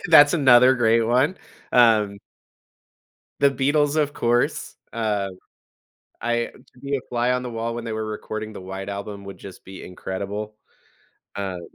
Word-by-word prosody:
That's 145 -1 +8
another 130 -3 +6
great 115 -1 +3
one. 130 +10 +2 0.4
Um 110 -4 +4 1.2
The 140 - +5
Beatles, 145 +2 +1
of 145 -2 +1
course, 120 -2 0 0.2
um, 100 -4 -2 0.8
I 120 0 0 0.3
to 125 - -20
be 140 +1 -2
a - - -1
fly 120 +1 +1
on 125 - 0
the 125 - -5
wall 115 0 -3
when 120 0 -6
they 115 - -4
were 110 0 -3
recording 110 0 -5
the 95 - -8
White 95 +1 -7
Album 100 0 -6
would 100 0 -9
just 95 -2 -11
be 95 0 -10
incredible. 100 +3 -5 0.8
Um 95 -3 -4
115 Hz, 155 wpm, -23 LUFS, 100-125 Hz, 1.2 s, That's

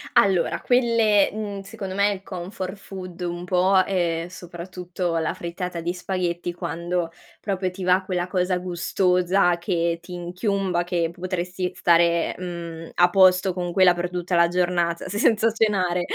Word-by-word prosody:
Allora, 190 -4 +3
quelle, 230 -5 +3
mhmm, 205 -2 -5
secondo 195 -1 -7
me 200 +1 +3
il 195 -1 -6
comfort 185 +1 -6
food 185 -3 -9
un 175 0 -4
po', 185 +1 +3
è 170 -3 0
soprattutto 175 0 -5
la 160 - 0
frittata 175 0 -5
di 170 +2 -2
spaghetti 180 -1 -2
quando 170 +1 -3 0.3
proprio 190 -2 -2
ti 185 +1 -7
va 180 +1 +4
quella 180 -1 -2
cosa 180 -1 0
gustosa 180 +1 +1
che 170 -1 0
ti 180 +1 -10
inchiumba, 180 +1 -1
che 175 -2 -1
potresti 180 0 -3
stare, 170 0 +3
mhmm, 170 -2 -6
a 175 0 +5
posto 185 0 +5
con 175 -1 -3
quella 180 0 +5
per 175 0 -3
tutta 180 0 -2
la 170 0 +5
giornata 175 -1 0
senza 215 +3 +3
cenare, 195 -5 +1
180 Hz, 150 wpm, -24 LUFS, 175-190 Hz, 0.3 s, a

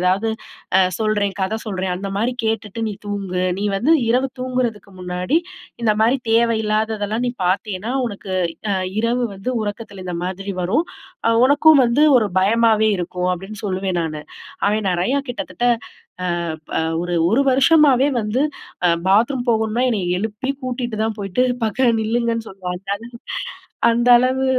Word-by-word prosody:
ஏதாவது 190 +5 +1 0.5
அ - - +6 0.2
சொல்றேன், 210 -2 0
கத 190 +4 -1
சொல்றேன். 190 -3 -2
அந்த 195 +1 -5
மாதிரி 235 +4 0
கேட்டுட்டு 220 0 -2
நீ 210 - -4
தூங்கு. 195 -3 -2 0.2
நீ 210 - 0
வந்து 280 +11 +3
இரவு 255 +3 +2
தூங்குறதுக்கு 250 -6 -2
முன்னாடி, 180 - 0 0.4
இந்த 215 -2 +3
மாரி 240 +5 +3
தேவை 230 0 +3
இல்லாததெல்லாம் 215 +1 -1
நீ - - -2
பாத்தீன்னா, 195 +4 -1 0.2
உனக்கு 200 -2 -7 0.4
அ - - +2 0.3
இரவு 240 +2 +1
வந்து 195 +7 -4
உறக்கத்துல 205 -2 -6
இந்த 180 -1 -3
மாதிரி 195 +2 -4
வரும். 230 - +1 0.6
உனக்கும் 290 +1 +6
வந்து 235 +5 +2 0.2
1 220 - +1
பயமாவே 220 +1 +3
இருக்கும்." 180 +1 -2
அப்டீன்னு 195 +4 -9
சொல்லுவேன் 190 -1 -2
நானு. 155 -2 -4 0.5
அவன் 210 0 +1
நெறையா 180 +10 +1
கிட்டத்தட்ட 195 -3 -4 0.8
அ - - -2 0.3
ப - - -2 0.2
1 175 0 -3 0.2
1 230 +7 +3
வருஷமாவே 275 0 +5
வந்து 215 +4 -1 0.4
அ - - +5 0.2
பாத்ரூம் 235 +6 +3
போகணுனா 220 +1 +1
என்னைய 205 -6 -1
எழுப்பி 220 +6 -3
கூட்டிட்டு 245 -2 -3
தான் 220 0 -1
போயிட்டு, 200 +4 0 0.2
"பக்கத்துல 235 +2 +2
நில்லுங்கன்னு" 230 +1 -1
சொல்லுவான். 180 -2 -5 1.1
அந்த 240 +1 +1
அளவு, 260 +2 +1
220 Hz, 145 wpm, -20 LUFS, 195-240 Hz, 1.1 s, அ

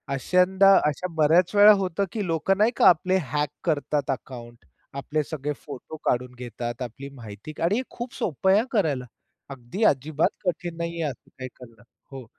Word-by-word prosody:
अश्यांदा 185 +6 +4 0.2
अशा 180 +5 -4
बऱ्याच 165 +6 +3
वेळा 205 +1 +9
होतं, 185 +2 -1
की 210 -4 -3
लोकं 165 +4 +1
नाही 215 +3 +3
का - - +5
आपले 185 +2 +2
हॅक 150 -1 0
करतात 150 -4 -1
अकाउंट, 120 -6 -8 0.3
आपले 150 +2 -2
सगळे 150 -1 -4
फोटो 145 +2 -9
काढून 125 +1 0
घेतात, 120 0 -6
आपली 135 +3 -7
माहिती 110 +3 -10
का 165 - -6
आणि 185 +5 +2
हे - - 0
खूप 240 +1 -7
सोपं 190 +3 -1
आहे 200 - +5
हा 235 - -1
करायला. 150 - 0 0.4
अगदी, 135 - -5
अजिबात 150 -1 +2 0.2
कठीण 175 -1 -3
नाहीये 170 0 -3
असं 140 -6 -6
काही 130 -1 -6
करणं, 115 -3 -15 0.3
हो. 135 -3 -8
150 Hz, 175 wpm, -25 LUFS, 130-180 Hz, 0.4 s, वेळा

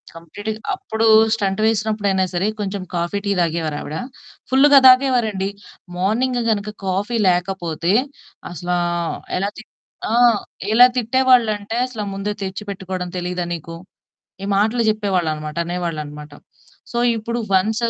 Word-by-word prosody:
కంప్లీట్‌గ 205 +6 -6 0.2
అప్పుడు 225 - -2 0.3
స్టంట్ 200 -2 -1
వేసినప్పుడు 215 -1 0
అయినా 190 -1 +2
సరే 180 +3 0
కొంచెం 200 -1 -3
కాఫీ, 175 +3 -1
టీ 200 - 0
తాగేవారావిడ. 160 -3 -2 0.5
ఫుల్లుగా 275 +2 +7
తాగేవారండి 245 -7 +4 0.5
మార్నింగ్ 240 +7 0
గనుక 210 -1 -1 0.2
కాఫీ 200 +5 -1
లేకపోతే 175 -1 -1 0.6
అసలు 175 +1 -2 0.6
ఎలా 195 +2 -1
తిట్ 220 - -12 0.4
ఆ! - - +1 0.6
ఎలా 245 +3 +9
తిట్టేవాళ్ళంటే 230 -3 +2
అసలు 230 -4 -5
ముందే 195 +1 -3
తెచ్చిపెట్టుకోడం 190 -2 -5
తెలీదా 180 0 -3
నీకు? 165 0 -7 0.7
ఈ - - -3
మాటలు 220 +4 +2
చెప్పేవాళ్ళనమాట. 175 -8 -1
అనేవాళ్ళనమాట. 155 -4 -5 0.6
సో, 235 - -4 0.2
ఇప్పుడు 235 +2 -3
వన్సు 220 +5 +2
200 Hz, 115 wpm, -20 LUFS, 175-220 Hz, 0.7 s, ఎలా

